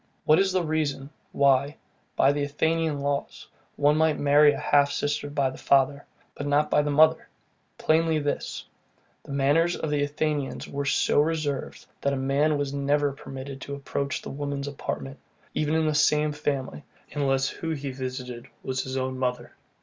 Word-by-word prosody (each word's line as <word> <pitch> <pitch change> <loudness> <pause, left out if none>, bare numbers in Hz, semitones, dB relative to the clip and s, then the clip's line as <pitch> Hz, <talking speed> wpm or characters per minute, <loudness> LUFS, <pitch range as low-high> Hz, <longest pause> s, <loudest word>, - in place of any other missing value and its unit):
What 155 +3 +5
is 195 0 +2
the 185 -1 +1
reason, 150 -3 -2 0.2
why, 140 +1 +2 0.4
by 135 - +4
the 145 0 -2
Athenian 160 +1 0
laws, 140 0 -3 0.3
one 145 +1 +3
might 160 -1 +3
marry 145 +1 +5
a - - -4
half 145 0 +3
sister 145 0 -2
by 140 -2 0
the - - -11
father, 140 +1 +2 0.3
but 145 - -5
not 145 +1 +2
by 150 - +4
the 150 - -2
mother? 155 +2 +4 0.5
Plainly 160 0 +2
this: 145 -1 -3 0.6
The - - -12
manners 145 +5 +2
of 155 - -3
the 145 -1 +1
Athenians 145 -1 -2
were 140 0 -4
so 140 - +2
reserved, 150 -3 -2 0.2
that 140 - +1
a - - -1
man 140 +3 +1
was 140 -1 -2
never 140 +1 +1
permitted 135 0 -8
to 140 - -5
approach 140 0 -3
the - - -6
women's 140 0 -4
apartment, 135 -1 -5 0.3
even 155 +1 0
in 160 0 +2
the 155 - +1
same 150 0 +3
family, 140 - -3 0.3
unless 135 -2 0
where 160 -1 -1
he 140 -1 -5
visited 125 -2 -6 0.2
his 130 0 -2
own 130 0 -2
mother. 125 -1 -2
145 Hz, 170 wpm, -26 LUFS, 135-150 Hz, 0.6 s, What